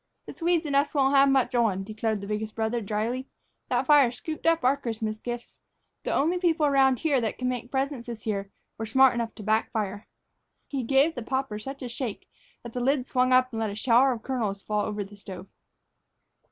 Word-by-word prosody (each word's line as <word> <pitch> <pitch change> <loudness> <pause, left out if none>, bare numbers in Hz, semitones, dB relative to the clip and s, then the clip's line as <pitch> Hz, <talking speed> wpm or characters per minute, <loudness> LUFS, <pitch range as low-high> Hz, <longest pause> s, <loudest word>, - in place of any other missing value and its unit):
"The - - -8
Swedes 340 -1 +1
and 285 -2 -1
us 285 +2 +2
won't 275 0 +3
have 275 0 +6
much 270 -1 +2
on," 220 -6 +1
declared 215 0 -2
the 200 - -7
biggest 215 +1 -3
brother, 225 +1 -1
dryly. 225 +5 -2 0.4
"That 250 +1 +1
fire 285 -3 +6
scooped 310 +6 -5
up 330 0 +3
our 260 +2 +4
Christmas 220 -5 -4
gifts. 240 +1 -7 0.4
The - - -3
only 335 +6 +1
people 330 -4 +2
around 270 -2 +4
here 285 -4 +1
that 220 -2 -2
can 255 - -2
make 245 -1 -3
presents 270 -2 -2
this 230 -2 -7
year 200 -2 -2 0.3
were 225 - -3
smart 265 +4 +5
enough 235 -1 -3
to 215 - -9
backfire." 215 -1 -1 0.6
He 275 -2 -3
gave 275 +6 +3
the 245 - -5
popper 260 -3 -2
such 270 +4 -7
a - - -3
shake 235 -2 -5 0.4
that 235 -1 -9
the 250 - -2
lid 265 0 +1
swung 255 0 +1
up 255 0 +4
and 225 - -3
let 220 -1 0
a 200 - -6
shower 245 +4 +4
of 230 -3 -5
kernels 215 -7 -2
fall 210 -1 -1
over 210 -1 -3
the 200 +1 -13
stove. 190 -2 -9
245 Hz, 210 wpm, -27 LUFS, 220-270 Hz, 0.6 s, have